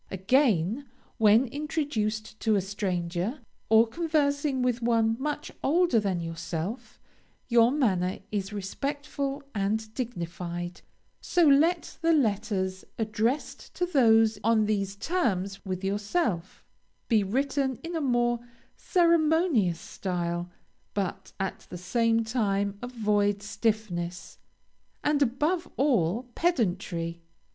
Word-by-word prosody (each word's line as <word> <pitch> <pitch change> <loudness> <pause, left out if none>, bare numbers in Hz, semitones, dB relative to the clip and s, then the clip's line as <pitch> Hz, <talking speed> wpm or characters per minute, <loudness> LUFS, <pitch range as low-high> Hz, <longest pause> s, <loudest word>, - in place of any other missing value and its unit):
Again, 220 - +2 0.3
when 220 +3 +6
introduced 235 -7 -3
to 220 -2 +2
a 200 - +2
stranger, 185 - -2 0.3
or 225 +1 +7
conversing 285 -1 0
with 245 -1 0
one 225 -1 +2
much 295 +2 -3
older 330 -5 +3
than 195 -4 -1
yourself, 165 +6 -5 0.5
your 235 -1 +6
manner 195 -10 +1
is 200 -1 -2
respectful 275 +7 -3
and 215 +1 -1
dignified; 175 -6 -5 0.4
so 355 - +2
let 320 +5 +3
the 330 0 +4
letters 205 -7 0
addressed 225 +5 -2
to 360 - 0
those 225 -9 +4
on 220 -1 +3
these 200 -2 -1
terms 200 - -1
with 185 0 -3
yourself, 200 - -1 0.4
be 225 -3 +4
written 265 +5 0
in 335 +1 -5
a 325 - -1
more 240 -3 +2 0.4
ceremonious 320 - +3
style, 175 -1 -3 0.5
but 190 -1 -3
at 190 0 -4
the 180 - -6
same 230 +6 +1
time 205 -3 0
avoid 210 -4 0
stiffness, 205 -5 -2 0.6
and 295 -1 +2
above 300 +8 +1
all, 235 - +2
pedantry. 180 - -1
220 Hz, 110 wpm, -28 LUFS, 195-275 Hz, 0.6 s, or